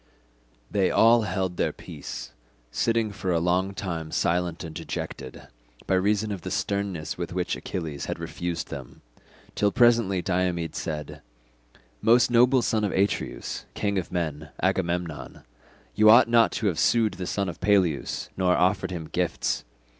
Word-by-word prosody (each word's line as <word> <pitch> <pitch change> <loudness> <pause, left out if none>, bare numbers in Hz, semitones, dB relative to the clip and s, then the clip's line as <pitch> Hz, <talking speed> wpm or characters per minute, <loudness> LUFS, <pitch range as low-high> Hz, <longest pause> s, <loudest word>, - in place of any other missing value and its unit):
They 95 -2 +2
all 115 +1 +5
held 95 -2 -2
their - - +1
peace, - - -8 0.4
sitting 115 - +1
for 95 -2 -3
a 85 - +2
long 90 +3 0
time 85 -5 -4
silent 85 +1 0
and 80 -2 -7
dejected, 65 -4 -6 0.4
by - - 0
reason 105 +3 +1
of 100 -3 -4
the - - -5
sternness 100 -6 -2
with - - -4
which - - -1
Achilles 80 -6 -5
had - - -4
refused 85 -2 -4
them, 65 -3 -9 0.5
till 105 -1 +2
presently 115 -6 +3
Diomed 90 -3 -1
said, 75 -2 -5 0.8
"Most 120 +2 +4
noble 125 +1 +5
son 110 -1 +1
of 100 - 0
Atreus, 100 +2 -1
king 100 -2 0
of 90 - -7
men, 80 -3 -3
Agamemnon, 90 -3 -2 0.5
you 110 - +5
ought 120 +3 +8
not 115 -1 +4
to 110 - -2
have 90 -6 +1
sued 115 -3 +3
the 90 -1 -5
son 100 -1 -1
of 85 -2 -7
Peleus 90 -7 +1
nor 90 -1 +2
offered 95 0 +2
him 85 -3 -5
gifts. 90 +1 -1
95 Hz, 155 wpm, -26 LUFS, 85-105 Hz, 0.8 s, ought